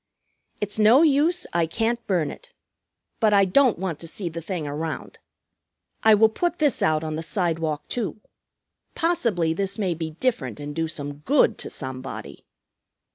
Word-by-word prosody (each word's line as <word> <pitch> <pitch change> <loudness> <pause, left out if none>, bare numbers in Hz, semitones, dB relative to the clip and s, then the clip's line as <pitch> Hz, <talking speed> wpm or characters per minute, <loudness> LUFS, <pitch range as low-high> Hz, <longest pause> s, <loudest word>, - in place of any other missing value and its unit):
"It's 205 +1 -2
no 230 +8 +6
use, 315 +3 +3
I 170 -1 +2
can't 230 +7 -1
burn 175 -6 +1
it. - - -14 0.6
But 215 -3 +4
I 200 -1 +5
don't 250 +5 +4
want 180 -4 -3
to 165 - -7
see 175 +2 -3
the 165 +1 -6
thing 165 -2 -4
around. 155 +3 -5 0.8
I 220 -1 +6
will 220 +2 +6
put 345 +10 -2
this 295 -6 +1
out 155 0 +2
on 155 -1 -3
the - - -3
sidewalk, 165 -4 -1
too. 225 -3 -3 0.8
Possibly 230 - +1
this 195 +3 -1
may 190 -5 0
be 160 -1 -6
different 135 - -1
and 145 0 -6
do 165 0 0
some 145 -2 -4
good 275 - +2
to - - -5
somebody." 130 - -7
180 Hz, 165 wpm, -24 LUFS, 160-225 Hz, 0.8 s, no